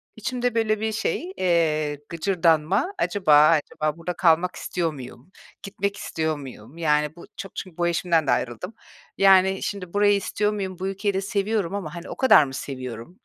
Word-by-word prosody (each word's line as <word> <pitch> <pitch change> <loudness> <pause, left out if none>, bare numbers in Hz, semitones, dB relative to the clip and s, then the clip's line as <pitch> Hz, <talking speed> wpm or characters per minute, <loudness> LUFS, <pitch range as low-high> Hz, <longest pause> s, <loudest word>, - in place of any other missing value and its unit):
içimde 245 +2 -2
böyle 215 -2 +1
bir 220 +1 -1
şey, 330 - -2
eee, 155 -5 +1
gıcırdanma: 175 - +1
“Acaba 155 - +4
acaba 155 -1 0
burada 170 +1 -4
kalmak 175 +1 +2
istiyor 165 -3 -2
muyum? 130 +4 -11 0.3
Gitmek 200 0 -3
istiyor 160 -6 -2
muyum?” 130 0 -11
Yani, 150 -1 +1
bu 170 - -12
çok 195 -4 -8
çün 185 -4 -7
bu 175 0 +1
eşimden 165 -2 +1
de - - +3
ayrıldım. 155 - -2 0.4
Yani, 190 0 +5
şimdi 190 -3 -5
burayı 205 0 +4
istiyor 210 +1 -1
muyum? 190 -3 -5
Bu 190 - -2
ülkeyi 195 +1 -1
de 190 - -1
seviyorum 200 -1 -1
ama, 180 -5 -5
hani, 170 0 -8
o - - -6
kadar 260 - +6
mı 135 - -6
seviyorum? 130 +3 -7
180 Hz, 170 wpm, -24 LUFS, 155-200 Hz, 0.4 s, kadar